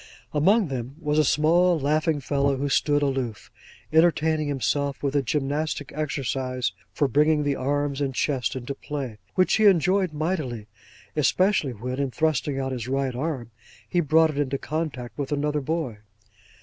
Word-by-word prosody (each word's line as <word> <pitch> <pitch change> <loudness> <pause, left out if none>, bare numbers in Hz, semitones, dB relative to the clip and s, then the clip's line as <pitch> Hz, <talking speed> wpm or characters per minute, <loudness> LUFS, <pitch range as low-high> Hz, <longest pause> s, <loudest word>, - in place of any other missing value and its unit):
Among 190 +7 +3
them 130 0 -5
was 150 -2 +1
a - - +5
small 170 +4 +3
laughing 155 +1 +1
fellow, 140 0 +1
who 140 +2 -1
stood 145 +1 +2
aloof, 130 -6 -2 0.4
entertaining 160 -2 +3
himself 140 +1 -1
with 140 0 -1
a 145 - +4
gymnastic 145 +2 -2
exercise 130 -6 -2 0.2
for 145 - +1
bringing 150 +2 +3
the 145 -1 0
arms 145 +1 -1
and 135 -2 -1
chest 135 -2 0
into 130 +1 -4
play; 135 -6 -6 0.2
which 185 +3 +3
he 220 - +3
enjoyed 185 -1 +4
mightily; 150 - -2 0.5
especially 155 -1 +2
when, 125 +4 -5
in 140 -1 0
thrusting 150 -1 0
out 135 -1 -2
his 125 -2 -4
right 135 0 -1
arm, 130 -3 -3 0.4
he 175 - 0
brought 160 0 +4
it 145 - -4
into 140 -1 0
contact 145 -6 -4
with 140 0 -3
another 150 0 0
boy. 140 -7 -3
145 Hz, 160 wpm, -25 LUFS, 135-155 Hz, 0.5 s, a